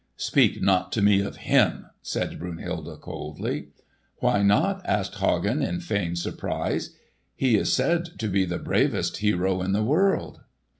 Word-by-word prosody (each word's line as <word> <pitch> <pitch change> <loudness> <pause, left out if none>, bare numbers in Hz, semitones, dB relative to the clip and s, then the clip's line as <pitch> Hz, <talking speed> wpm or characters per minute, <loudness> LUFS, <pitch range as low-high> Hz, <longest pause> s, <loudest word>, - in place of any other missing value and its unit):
"Speak - - +2
not 95 -1 +2
to 110 - 0
me 100 -1 +5
of 100 - -4
him," - - +3 0.2
said - - -3
Brunhilde 85 -1 -6
coldly. - - -5 0.5
"Why 105 - +2
not?" 145 - +3
asked 100 - -1
Hagen 100 - +1
in 175 +5 -1
feigned 100 - -2
surprise. 85 - -3 0.4
"He 130 -4 +3
is - - +1
said 170 +5 0
to 110 - -2
be 95 -1 +2
the 90 -1 -3
bravest 95 -6 0
hero 95 -3 +1
in 95 +1 -1
the 105 +2 +1
world." 180 - +1
100 Hz, 150 wpm, -25 LUFS, 95-130 Hz, 0.5 s, me